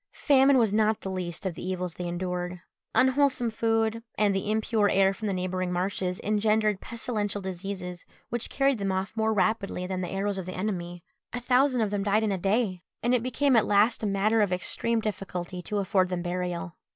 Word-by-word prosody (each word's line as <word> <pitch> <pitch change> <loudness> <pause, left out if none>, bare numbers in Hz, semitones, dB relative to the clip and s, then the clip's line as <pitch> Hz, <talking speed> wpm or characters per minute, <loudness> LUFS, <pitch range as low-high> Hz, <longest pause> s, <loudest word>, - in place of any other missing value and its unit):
Famine 275 -1 +4
was 225 -5 +3
not 215 0 +2
the 190 - -4
least 180 -1 -4
of 185 - -1
the - - -9
evils 180 -1 -3
they 175 +1 -5
endured. 180 0 -3 0.4
Unwholesome 260 -2 +3
food, 225 0 0 0.2
and 210 -2 +3
the 195 +2 -2
impure 215 -1 +2
air 195 0 +4
from 215 +2 -5
the 200 - 0
neighbouring 185 0 -2
marshes, 180 0 -1
engendered 215 -1 +2
pestilential 215 -4 -3
diseases, 185 -1 -5 0.3
which 240 0 -2
carried 275 -3 +2
them 195 -1 -1
off 190 +3 -2
more 220 0 +1
rapidly 205 -3 0
than 185 0 -3
the 180 - -3
arrows 195 0 -1
of 185 - -6
the 185 - -5
enemy. 175 -3 -3 0.3
A 245 - -2
thousand 250 +1 +3
of 210 -2 0
them 205 -1 -1
died 205 +2 +2
in 215 - +1
a 195 - 0
day, 195 -1 0 0.2
and 240 +1 +2
it 250 - +3
became 260 +2 +2
at 220 -2 +4
last 210 +3 +3
a 215 - 0
matter 210 +3 +2
of 205 -3 +1
extreme 225 +5 0
difficulty 185 -4 -4
to 210 +4 -3
afford 190 -2 +2
them 180 -1 -2
burial. 180 0 -3
200 Hz, 200 wpm, -27 LUFS, 185-220 Hz, 0.4 s, Famine